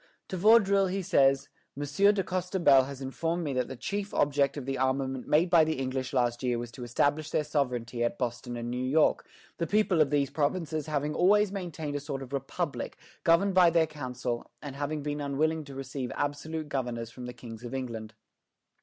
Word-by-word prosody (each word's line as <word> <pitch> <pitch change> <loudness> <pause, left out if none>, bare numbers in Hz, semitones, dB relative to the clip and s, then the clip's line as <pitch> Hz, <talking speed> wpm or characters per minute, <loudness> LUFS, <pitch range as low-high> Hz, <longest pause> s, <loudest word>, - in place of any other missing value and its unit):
To - - -3
Vaudreuil 200 -1 +5
he 190 +1 -2
says: 135 -5 +3 0.3
"Monsieur 145 +9 +3
de 200 -2 0
Costebelle 180 -8 +3
has 140 -1 -8
informed 165 +6 -2
me 145 -3 -2
that 125 -1 0
the 130 - -6
chief 200 - -4
object 140 0 +2
of 140 - -5
the 135 0 -2
armament 130 0 -1
made 160 +4 +4
by 170 -3 +7
the 155 0 0
English 130 0 -2
last 120 -2 +1
year 125 -2 0
was 120 0 -5
to 125 - -9
establish 145 +6 0
their 150 - +1
sovereignty 125 -5 -1
at 120 0 -1
Boston 120 0 -3
and 120 0 -4
New 125 +1 -2
York, 145 +5 +2 0.3
the 170 - 0
people 205 -5 +3
of 150 - +3
these 140 -2 +1
provinces 155 0 -1
having 150 0 -1
always 205 +4 +4
maintained 165 -7 -4
a - - 0
sort 140 -2 -5
of 130 +1 -11
republic, 140 +3 -3 0.3
governed 180 +3 +4
by 180 -2 +6
their 165 -1 +3
council, 125 -5 -5
and 140 -3 -8
having 145 +1 -3
been 145 0 -3
unwilling 155 +3 0
to 140 -1 -10
receive 135 -1 -5
absolute 150 +2 -3
governors 120 -4 -3
from 125 0 -8
the - - -5
kings 115 -1 -10
of 120 +2 -5
England. 115 -4 -5
145 Hz, 200 wpm, -29 LUFS, 130-165 Hz, 0.3 s, by